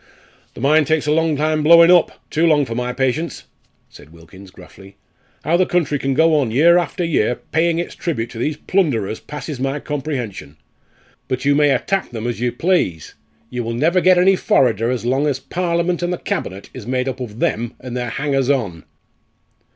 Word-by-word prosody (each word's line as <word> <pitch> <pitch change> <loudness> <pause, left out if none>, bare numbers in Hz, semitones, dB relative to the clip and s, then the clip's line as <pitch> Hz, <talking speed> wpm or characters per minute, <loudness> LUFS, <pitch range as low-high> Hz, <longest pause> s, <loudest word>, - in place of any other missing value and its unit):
"The - - -9
mine 150 +4 +4
takes 155 0 0
a 150 - +1
long 160 0 +2
time 155 +1 0
blowing 170 +2 +7
up 175 -2 +2
too 165 +2 +2
long 150 -3 +3
for 115 - -5
my 125 +1 -2
patience," 135 +6 -2 0.4
said 75 - -16
Wilkins, 85 +4 -15
gruffly. 95 0 -15 0.5
"How 170 +2 +2
the 185 - +2
country 150 -5 0
can 135 0 -1
go 160 +2 +4
on 130 -5 0
year 165 +9 +5
after 175 +1 -3
year 125 -8 +1
paying 165 +5 -1
its 170 - -3
tribute 120 -10 -4
to 115 - -8
these 150 +4 -2
plunderers 130 - -1
passes 150 -1 -7
my 135 +2 -2
comprehension. 130 - -5 0.7
But 130 +1 -3
you 145 - +4
may 145 0 +3
attack 195 +7 0
them 115 -1 -6
as 120 -3 -3
you 120 0 0
please. 120 - -1 0.4
You 125 -1 -3
will 115 0 -4
never 165 +8 +2
get 185 0 +5
any 190 +2 +5
forrarder 120 - +1
so 120 - -6
long 135 +4 +1
as 135 -3 -1
Parliament 170 +1 -1
and 175 0 -1
the 180 - -2
Cabinet 95 - -5
is 120 -4 -9
made 125 0 -1
up 130 0 -4
of 115 -4 -7
them 120 0 -2
and 125 -1 -7
their 125 -1 -3
hangers 135 0 -1
on." 100 - -1
140 Hz, 195 wpm, -19 LUFS, 120-165 Hz, 0.7 s, blowing